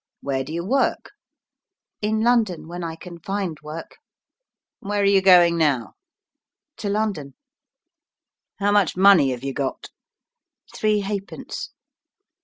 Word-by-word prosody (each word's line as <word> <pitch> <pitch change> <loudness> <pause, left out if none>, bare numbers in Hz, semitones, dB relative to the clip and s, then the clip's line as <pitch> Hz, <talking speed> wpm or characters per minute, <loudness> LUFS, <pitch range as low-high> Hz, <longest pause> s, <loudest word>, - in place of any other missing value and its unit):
"Where 135 -1 -2
do 140 - -9
you 170 +2 -3
work?" 265 +6 0 0.9
"In 215 +1 0
London 225 -8 +1
when 175 +1 -6
I 165 -1 -4
can 170 +1 -11
find 195 -3 -3
work." 155 +2 -9 0.8
"Where 205 +1 -3
are 200 - +2
you 200 -1 +4
going 175 -3 +6
now?" 135 -9 +1 0.8
"To 205 - -4
London." 200 -9 -2 1.2
"How 205 0 +1
much 205 -4 +2
money 190 -7 +6
have 125 -1 -4
you 135 0 -3
got?" 135 -1 -4 0.8
"Three 215 -1 +1
halfpence." 200 0 -5
185 Hz, 125 wpm, -23 LUFS, 155-205 Hz, 1.2 s, going